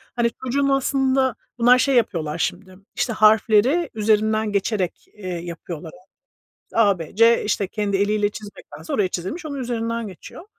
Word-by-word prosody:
Hani, 235 -1 +1
çocuğun 275 +2 0
aslında 265 -2 +1 0.2
bunlar 245 +2 +6
şey 275 0 +2
yapıyorlar 165 -9 0
şimdi; 185 +3 -3 0.2
işte 235 - -1
harfleri 220 - +4
üzerinden 215 0 +1
geçerek, 200 -2 -2
eee, 205 -3 -10
yapıyorlar. 170 -2 -7 0.7
İşte, - - -9
A, 200 -5 +4
B, 165 +3 -8
C, 230 +1 +5
işte 205 -2 0
kendi 200 -1 -1
eliyle 205 +1 +1
çizmektense 200 -7 -10
oraya 200 -3 +2
çizilmiş, 190 - -5
onun 285 -2 -5
üzerinden 230 -2 -3
geçiyor. 190 - -11
215 Hz, 145 wpm, -22 LUFS, 190-240 Hz, 0.7 s, bunlar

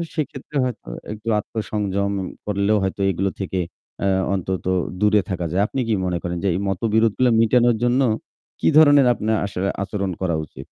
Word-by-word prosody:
সেক্ষেত্রে 150 -1 -5
হয়তো 125 - -4 0.3
একটু 110 +2 -12
আত্মসংযম 100 -2 -2 0.3
করলেও 105 +1 +1
হয়তো 95 +1 -2
এগুলো 95 +2 0
থেকে 95 -1 -2 0.5
আ - - +3 0.3
অন্তত 95 -1 -2 0.4
দূরে 105 -1 +4
থাকা 90 -2 -2
যায়। 95 +3 +2
আপনি 135 - -4
কি 110 - +1
মনে 90 -1 0
করেন 85 0 -3
যে - - +1
এই - - -1
মতবিরোধগুলো 110 +5 +2
মিটানোর 120 0 +4
জন্য 125 +3 +3 0.6
কি - - +1
ধরনের 145 -4 +7
আপনার 110 -1 0
আসলে 95 0 -2
আচরণ 100 -2 -3
করা 85 -3 0
উচিত? 75 - -15
105 Hz, 160 wpm, -22 LUFS, 95-115 Hz, 0.6 s, ধরনের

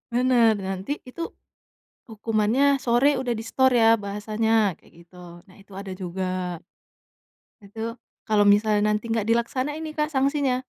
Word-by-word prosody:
Benar, 240 -4 +3
nanti 195 +10 -4
itu, 290 +7 -8 0.8
hukumannya 225 +5 +1
sore 260 +3 +2
udah 250 -2 -1
disetor 240 +3 +1
ya 230 -1 +5
bahasanya 210 0 0
kayak - - -24
gitu, 170 +1 -22 0.3
nah - - -18
itu 200 -1 -18
ada 195 0 -7
juga. 185 +1 -4 1.4
Itu 205 +2 -13 0.5
kalau 215 -2 +2
misalnya 210 0 +2
nanti 210 +2 -1
enggak 225 -1 -1
dilaksanain 260 +7 -1
nih 310 - -6
Kak 300 0 -1
sanksinya, 275 -2 +1
225 Hz, 135 wpm, -24 LUFS, 210-260 Hz, 1.4 s, ya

